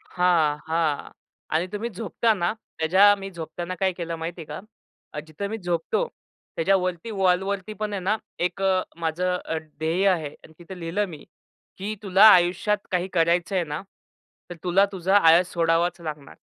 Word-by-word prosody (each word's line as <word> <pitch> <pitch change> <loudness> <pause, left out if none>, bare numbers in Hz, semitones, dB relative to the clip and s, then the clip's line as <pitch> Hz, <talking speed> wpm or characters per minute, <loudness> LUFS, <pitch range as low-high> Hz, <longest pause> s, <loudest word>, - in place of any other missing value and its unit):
हां, 170 -5 +1
हां. 160 -2 -1 0.4
आणि 165 +3 +1
तुम्ही 210 +3 -3
झोपता 225 +2 0
ना 175 -2 0 0.3
त्याच्या 190 +6 +6
मी 195 0 -7
झोपताना 170 +1 -6
काय 190 -1 +2
केलं 170 -2 -5
माहितीये 165 +1 -5
का? 150 - -7 0.5
अ, 150 - -4
जिथे 160 +6 -5
मी 220 +2 -4
झोपतो 175 - -1 0.5
त्याच्यावरती, 185 +2 0
वॉलवरती 190 0 0
पण 210 -1 -2
आहे 200 - -2
ना 205 +4 +1 0.3
एक 195 +2 -6
अ, 190 -1 +2 0.2
माझं 180 +3 0
अ, 160 - -2
ध्येय 160 +4 -2
आहे 165 -6 +1 0.2
आणि - - -15
तिथे 180 +2 -10
लिहिलं 175 +5 -1
मी 155 -4 -10 0.5
की 205 +3 -3
तुला 195 0 +5
आयुष्यात 185 +3 +3
काही 180 -1 0
करायचंय 175 +2 +1
ना 150 +1 -5 0.7
तर - - -5
तुला 180 +2 +4
तुझा 190 +1 +1
आळस 175 -1 +5
सोडावाच 170 +1 +1
लागणार. 150 -4 -7
180 Hz, 160 wpm, -24 LUFS, 165-195 Hz, 0.7 s, त्याच्या